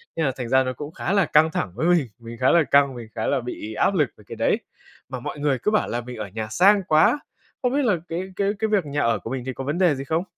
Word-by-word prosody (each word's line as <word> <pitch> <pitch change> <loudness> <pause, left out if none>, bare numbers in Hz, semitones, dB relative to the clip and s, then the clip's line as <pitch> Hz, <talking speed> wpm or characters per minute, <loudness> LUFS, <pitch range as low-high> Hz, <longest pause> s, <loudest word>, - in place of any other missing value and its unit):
Nên 160 - 0
là 135 - +1
thành 120 -2 -4
ra 130 0 +4
nó 130 0 -3
cũng 145 +4 -7
khá 185 - -2
là 200 -3 +4
căng 155 +1 +4
thẳng 95 - -2
với 145 +9 0
mình, 170 -7 +3
mình 115 0 -9
khá 130 - +4
là 170 -1 +5
căng, 140 -2 +3
mình 120 -2 -8
khá 110 - -2
là 140 -2 +1
bị 110 -3 -6
áp 195 - +2
lực 150 -9 +2
về 105 - -17
cái - - -7
đấy. - - +1 0.5
Mà 130 - -5
mọi 135 - -6
người 145 -2 +1
cứ 210 - +2
bảo 215 - +2
là 120 - -2
mình 125 0 -9
ở 105 -1 -5
nhà 110 +3 -5
sang 195 - +4
quá. 155 - +4 0.4
Không 250 0 0
biết 290 - +2
là 200 -6 +3
cái 165 +2 -2
cái 200 0 +1
cái 220 - +1
việc 200 -6 +2
nhà 145 0 -2
ở 115 -3 +1
của - - -8
mình 130 0 -3
thì 130 - -3
có 135 - -6
vấn 145 +5 -2
đề 175 -5 +3
gì 135 - -5
không? 160 +5 -1
140 Hz, 305 wpm, -23 LUFS, 125-175 Hz, 0.5 s, là